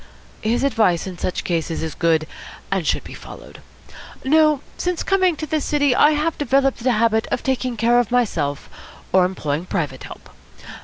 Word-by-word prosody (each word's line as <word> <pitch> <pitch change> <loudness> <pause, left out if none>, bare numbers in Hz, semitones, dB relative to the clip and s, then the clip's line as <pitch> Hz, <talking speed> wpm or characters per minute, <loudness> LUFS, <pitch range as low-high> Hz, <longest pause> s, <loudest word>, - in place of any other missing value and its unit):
His 230 +4 0
advice 220 -11 +2
in 185 -2 -7
such 180 - -2
cases 165 -2 -2
is 160 -2 -4
good, 165 -2 +1 0.5
and 190 -5 -1
should - - 0
be - - -10
followed. - - -12 0.6
No; 305 0 +4
since 360 -1 -2
coming 375 -3 +2
to 310 - -5
this 310 -1 -1
city 285 -4 +2
I 295 +4 +5
have 310 +2 -1
developed 270 -3 +1
a 255 -1 +3
habit 220 0 +2
of - - -3
taking 255 -2 -1
care 235 +2 +3
of 240 -4 0
myself, 165 - -1 0.5
or 185 -1 +5
employing 165 -2 -3
private 145 -8 -3
help. - - -12
235 Hz, 170 wpm, -21 LUFS, 175-285 Hz, 0.6 s, I